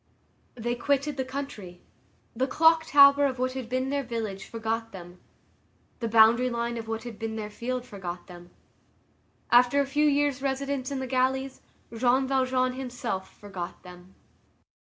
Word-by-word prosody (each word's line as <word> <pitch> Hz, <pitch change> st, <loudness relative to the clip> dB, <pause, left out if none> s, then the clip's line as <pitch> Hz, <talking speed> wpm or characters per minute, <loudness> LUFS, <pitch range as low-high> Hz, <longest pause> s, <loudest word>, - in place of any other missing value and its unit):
They 240 Hz, 0 st, -2 dB
quitted 280 Hz, +3 st, 0 dB
the 265 Hz, -, -1 dB
country. 255 Hz, -10 st, -7 dB, 0.6 s
The 260 Hz, +3 st, 0 dB
clock 320 Hz, +3 st, +4 dB
tower 280 Hz, 0 st, +7 dB
of 260 Hz, -1 st, -4 dB
what 255 Hz, +1 st, 0 dB
had 260 Hz, -3 st, -6 dB
been 255 Hz, +1 st, -1 dB
their 285 Hz, 0 st, 0 dB
village 225 Hz, -6 st, -5 dB
forgot 225 Hz, 0 st, -3 dB
them; 175 Hz, -1 st, -11 dB, 0.8 s
the 230 Hz, -, -2 dB
boundary 230 Hz, +3 st, +5 dB
line 235 Hz, 0 st, -2 dB
of 225 Hz, -1 st, -6 dB
what 225 Hz, 0 st, -4 dB
had 235 Hz, -3 st, -9 dB
been 225 Hz, -1 st, -4 dB
their 210 Hz, -1 st, -5 dB
field 250 Hz, +3 st, -4 dB
forgot 180 Hz, -6 st, -7 dB
them; 175 Hz, -1 st, -13 dB, 1.0 s
after 245 Hz, +3 st, +5 dB
a 280 Hz, -, +2 dB
few 295 Hz, +2 st, +2 dB
years' 285 Hz, -2 st, +1 dB
residence 275 Hz, -1 st, -2 dB
in 280 Hz, -, -3 dB
the 265 Hz, -, -3 dB
galleys, 260 Hz, +1 st, -1 dB, 0.3 s
Jean 255 Hz, +3 st, +2 dB
Valjean 255 Hz, -1 st, +1 dB
himself 245 Hz, -7 st, -5 dB
forgot 190 Hz, -4 st, -7 dB
them. 180 Hz, +1 st, -14 dB
250 Hz, 155 wpm, -27 LUFS, 220-270 Hz, 1.0 s, tower